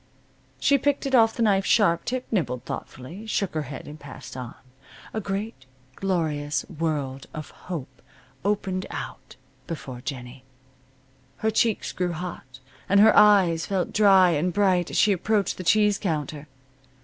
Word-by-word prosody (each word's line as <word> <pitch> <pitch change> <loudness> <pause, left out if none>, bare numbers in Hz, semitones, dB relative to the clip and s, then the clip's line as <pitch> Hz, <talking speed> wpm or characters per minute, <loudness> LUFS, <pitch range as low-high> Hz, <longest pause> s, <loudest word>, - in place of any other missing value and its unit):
She 280 -1 +3
picked 285 +1 0
it 270 - -3
off 225 -3 +5
the 235 - 0
knife's 195 -3 +2
sharp 170 -7 +3
tip, 255 0 -2
nibbled 125 - -1
thoughtfully, 170 - -7
shook 200 -3 -1
her 155 - -1
head, 135 - -8
and 150 +1 -10
passed 130 -2 -10
on. 125 -2 -7 0.6
A 220 - -2
great, 195 - -5 0.3
glorious 155 -6 -1
world 145 -4 -3
of 155 -1 -7
hope 135 -8 -8 0.4
opened 195 -2 -1
out - - -7 0.3
before 130 -7 -6
Jennie. 125 0 -7 0.9
Her 220 - 0
cheeks 220 0 +1
grew 180 -1 -2
hot, 165 -6 -7 0.3
and 200 +1 +5
her 220 +2 +7
eyes 190 -6 +5
felt 190 -3 -1
dry 195 -4 +6
and 170 +3 0
bright 185 -2 +2
as - - -3
she 210 - +5
approached 200 +2 0
the - - -4
cheese 210 +2 +3
counter. 150 -4 -3
180 Hz, 150 wpm, -25 LUFS, 150-205 Hz, 0.9 s, her